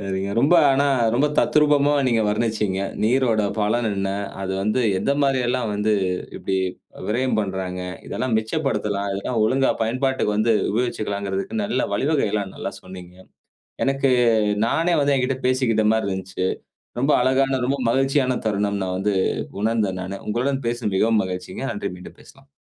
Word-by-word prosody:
நீங்க 95 +1 -2
ரொம்ப 145 +8 +5
ஆனா 135 +1 +3 0.3
ரொம்ப 135 +5 +3
தத்ரூபமா 145 -1 +4 0.2
நீங்க 115 -2 +2
வர்ணிச்சீங்க. 105 -2 0 0.2
நீரோட 115 -1 +2 0.2
பலன் 110 +2 +1
என்ன? 95 -1 -2 0.3
அது 95 0 -2
வந்து 105 +5 0 0.2
எந்த - - 0
மாரி 135 -2 +2
எல்லாம் 125 -2 0
வந்து 105 +1 0 0.5
இப்படி 95 - -2 0.5
விரயம் 120 +1 0
பண்றாங்க? 95 -2 -3 0.3
இதெல்லா 130 - -3
மிச்சப்படுத்தலாம். 110 -5 -1
இதெல்லா 100 +5 -3
ஒழுங்கா 130 +5 +2
பயன்பாட்டுக்கு 130 -1 0
வந்து 115 +1 +3 0.2
உபயோகிச்சுகலாங்கிறதுக்கு 100 - -2
நல்லா 205 - 0
வழிவகைகள்லாம் 105 -6 0
நல்லா - - -4
சொன்னீங்க. 90 -1 -11 0.7
எனக்கு 135 0 +1 0.6
நானே 165 +8 +1
வந்து 140 0 +2
எங்கிட்ட 130 0 0
பேசிக்கிட்ட 125 -4 +2
மாரி 110 -2 0
இருந்துச்சு. 95 -1 -3 0.5
ரொம்ப 140 +4 +2
அழகான, 130 +1 +2
ரொம்ப 135 +2 0
மகிழ்ச்சியான 135 0 +1
தருணம் 100 -1 0
நா 95 - -3
வந்து 100 +1 0 0.5
உணர்ந்தேன் 105 -4 0
நானு. 95 +2 -6
உங்களுடன் 130 +5 -1
பேசுன 120 -3 -2
மிகவும் 110 +2 +3
மகிழ்ச்சிங்க. 90 +3 -5
நன்றி 100 -1 -4
மீண்டும் 90 - -12
பேசலாம். 135 0 -19
115 Hz, 140 wpm, -22 LUFS, 100-135 Hz, 0.7 s, ரொம்ப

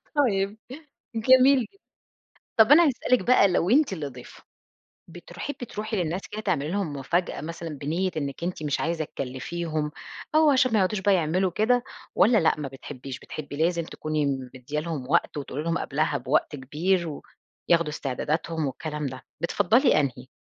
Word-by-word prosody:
طيب. 210 -7 +1 0.6
جميل 260 +4 +6
جدًا. 395 - -7 0.8
طَب 225 +5 +6
أنا 335 +2 +8
هاسألِك 250 -1 +2
بقى 240 -5 +6
لو 180 +1 +1
أنتِ 280 -4 +4
اللي 155 -6 -3
ضيفة، 125 -2 -11 0.7
بتر 175 +1 -12
حبي 285 -4 -5
تروحي 215 0 -4
للناس 175 +1 -1
كده 215 - -4
تعملي 150 -7 -1
لهم 190 -6 -1
مفاجأة 170 +6 -1
مثلًا 165 +2 -6
بنيِّة 155 +6 -2
إنِك 140 +2 -3
أنتِ 180 -3 -3
مش 145 -2 -1
عايزة 165 -1 -1
تكلفيهم 150 +4 -4 0.4
أو 310 -1 +6
عشان 255 -3 +3
ما 220 - +4
يقعدوش 190 +1 +1
بقى 200 +1 +3
يعملوا 180 +2 +1
كده، 240 +6 +2 0.3
والّا 225 +2 +5
لأ 160 - +3
ما 140 - -3
بتحبيش 135 0 -8
بتحبي 145 -2 -8
لازم 170 +2 +1
تكوني 155 -2 -2 0.3
مدية 135 +4 -4
لهم 150 -5 -5
وقت، 170 -2 +2
وتقولي 145 +1 -4
لهم 165 +1 0
قبلها 145 0 0
بوقت 145 +2 0
كبير 165 +6 0
و 145 - -7 0.5
ياخدوا 170 -2 +4
استعداداتهم 155 +3 -2
والكلام 150 +2 -4
ده، 130 -1 -7 0.2
بتفضَّلي 205 - +3
أنهي؟ 130 -3 -3
170 Hz, 160 wpm, -26 LUFS, 150-205 Hz, 0.8 s, أنا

